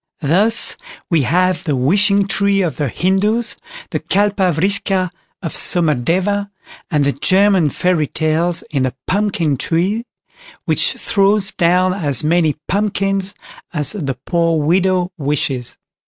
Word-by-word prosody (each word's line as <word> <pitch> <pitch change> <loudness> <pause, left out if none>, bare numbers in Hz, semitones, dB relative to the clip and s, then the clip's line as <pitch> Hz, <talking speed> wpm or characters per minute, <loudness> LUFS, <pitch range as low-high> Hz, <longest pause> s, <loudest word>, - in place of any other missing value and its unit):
Thus 200 +10 +2 0.3
we 165 -3 +3
have 180 +6 +1
the 150 - -1
"Wishing 200 +9 +3
Tree" 200 0 +2
of 165 -6 -3
the 145 - -1
Hindoos, 210 - +1 0.4
the - - -1
Kalpa 200 -2 +1
Vriksha 185 +2 0 0.3
of 165 - -3
Somadeva, 180 +6 0 0.4
and 150 -5 +1
of 140 - +1
the - - -21
German 190 -3 +3
Fairy 170 0 0
Tales 160 +3 -1
in 140 -3 0
the 130 -1 -1
"Pumpkin 190 -7 0
Tree", 190 - 0 0.6
which - - +2
throws 200 0 +1
down 180 +1 +2
as 155 -6 0
many 160 -1 +2
pumpkins 195 -1 -1 0.4
as 150 -3 -2
the 140 - -4
poor 165 -2 +1
widow 180 +3 +1
wishes. 135 -4 -2
180 Hz, 130 wpm, -17 LUFS, 155-200 Hz, 0.6 s, we